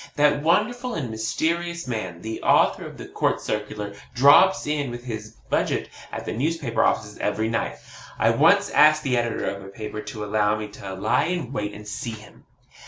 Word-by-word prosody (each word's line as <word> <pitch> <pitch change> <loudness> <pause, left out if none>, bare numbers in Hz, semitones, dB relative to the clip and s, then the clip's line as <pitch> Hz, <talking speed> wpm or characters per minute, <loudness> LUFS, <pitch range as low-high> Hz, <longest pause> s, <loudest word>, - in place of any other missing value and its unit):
That 145 -1 +3
wonderful 235 - +1
and 130 -8 -3
mysterious 170 +9 -1
man, 95 -8 -4
the 110 0 -5
author - - +3
of - - -11
the - - -8
COURT - - 0
CIRCULAR, 105 -1 -4 0.2
drops 145 +9 +6
in 145 -3 -1
with 120 0 -7
his 110 -2 -6 0.2
budget - - 0 0.2
at - - -5
the - - -3
newspaper 140 -2 0
offices 105 0 0
every 110 +1 0
night. 115 - -2 0.4
I - - +4
once - - +4
asked 155 0 +5
the 130 -3 +1
editor 120 -1 -1
of 100 0 -3
a - - -10
paper 105 +1 -6
to 105 -1 -6
allow 105 0 +1
me 105 0 -5
to 100 -2 -8
lie 95 - +1
in 175 -6 -2
wait 105 -3 -3
and 105 0 -10
see 115 - -4
him. 105 -2 -14
115 Hz, 185 wpm, -24 LUFS, 105-150 Hz, 0.4 s, drops